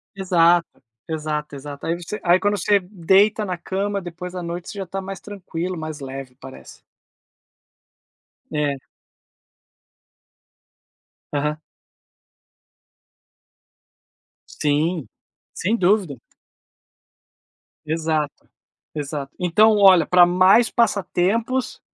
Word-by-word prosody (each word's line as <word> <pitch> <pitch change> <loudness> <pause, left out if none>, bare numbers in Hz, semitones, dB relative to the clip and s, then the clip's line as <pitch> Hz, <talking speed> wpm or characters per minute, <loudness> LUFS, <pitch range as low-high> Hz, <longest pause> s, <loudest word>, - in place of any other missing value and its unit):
Exato. 175 -4 +2 0.3
Exato, 150 -1 -3
exato. 140 +1 -8
Aí 165 - 0
você 210 +5 -6
aí 175 +1 +4
quando 205 0 +1
você 205 +2 +3
deita 195 +3 +2
na 185 -3 -3
cama, 200 +3 -2
depois 180 +1 -8
a 180 - -4
noite 170 +1 -6
você 215 - -8
já 195 - -4
está 195 +2 -5
mais 190 -1 -7
tranquilo, 185 -3 -5
mais 155 -1 -6
leve, 135 -1 -7
parece. 135 -1 -12 1.7
É. 145 -2 -1 2.6
Aham. 150 +1 -1 2.9
Sim. 150 +1 -1 0.5
Sem 215 +6 0
dúvida. 185 - +2 1.7
Exato, 155 -2 -2 0.5
exato. 145 -2 -5
Então 210 +5 +4
olha, 190 -5 +6
pra 180 -1 +6
mais 185 +6 +5
passatempos, 230 +3 0
175 Hz, 95 wpm, -22 LUFS, 155-195 Hz, 2.9 s, olha